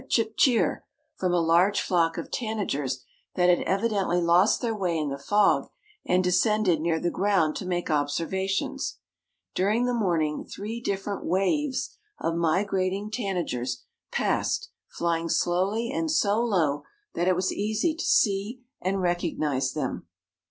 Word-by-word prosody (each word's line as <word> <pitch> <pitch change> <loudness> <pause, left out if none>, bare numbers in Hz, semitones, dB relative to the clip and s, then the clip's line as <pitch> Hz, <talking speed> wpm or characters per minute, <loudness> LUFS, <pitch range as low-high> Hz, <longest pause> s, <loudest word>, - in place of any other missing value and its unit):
chip 225 -1 +1
cheer!_ 245 -4 +3 0.4
from 185 -1 -1
a 175 - +3
large 170 +5 +3
flock 165 -2 +1
of - - -6
tanagers 145 - -2 0.3
that 180 0 +3
had 175 - +4
evidently 195 -3 +1
lost 175 +4 +4
their 235 -3 -1
way 180 -5 -1
in 150 -2 -1
the 140 - -4
fog, 205 +8 +2 0.3
and 180 +1 +2
descended 185 -1 +2
near 165 0 +1
the 175 - -1
ground 190 -6 +1
to 185 - -5
make 175 -2 -1
observations. 165 +6 -1 0.6
During 210 +6 +1
the 245 - 0
morning 170 -9 0
three 220 +4 -6
different 200 -2 -3
waves 255 - 0 0.2
of 165 - -1
migrating 190 +4 0
tanagers 170 - -2 0.3
passed, - - 0 0.2
flying 165 -1 -1
slowly 195 +9 +1
and 320 +3 -1
so 215 -8 +2
low 165 -11 +1 0.3
that 175 - -1
it 185 - +4
was 185 +1 0
easy 215 +10 0
to 325 - -5
see 210 +4 +1 0.2
and 190 +1 -1
recognize 155 -7 0
them. 135 - -4
185 Hz, 145 wpm, -26 LUFS, 170-210 Hz, 0.6 s, had